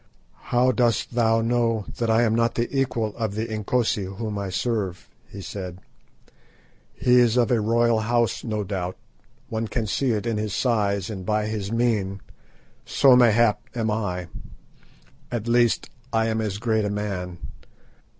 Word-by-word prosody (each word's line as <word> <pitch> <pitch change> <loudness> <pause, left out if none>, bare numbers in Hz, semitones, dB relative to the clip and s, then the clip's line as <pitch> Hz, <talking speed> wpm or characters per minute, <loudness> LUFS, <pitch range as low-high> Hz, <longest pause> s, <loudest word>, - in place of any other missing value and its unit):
"How 125 +1 +3
dost 120 -2 +1
thou 115 -1 +3
know 115 -2 +1
that 115 -1 -1
I 110 +1 +4
am 110 -2 +2
not 115 +1 +1
the 120 +4 -2
equal 115 -5 0
of 110 -3 -2
the 110 +1 -1
Inkosi 110 -1 0
whom 105 +3 -5
I 100 -1 -3
serve?" 95 -2 -2 0.2
he 100 - -9
said. 90 -2 -6 1.2
"He 125 0 +4
is 120 -1 +3
of 120 -1 +3
a 120 -3 +3
royal 115 +1 +2
house, 120 0 0
no 110 -3 -2
doubt; 90 -2 -4 0.5
one 115 -1 -2
can 115 0 -2
see 130 +5 0
it 105 +1 -2
in 115 -2 -1
his 105 -2 -2
size 105 -5 0
and 95 -3 -6
by 105 +2 0
his 105 -2 -3
mien; 110 -5 0 0.6
so, 135 -2 +5
mayhap, 115 -3 +4
am 110 -2 0
I. 90 -5 -2 1.1
At 120 -2 -3
least, 120 -1 +2 0.2
I 110 0 +2
am 110 0 0
as 105 -3 -2
great 110 0 0
a 105 - -1
man. 100 -4 -4
110 Hz, 160 wpm, -24 LUFS, 105-120 Hz, 1.2 s, so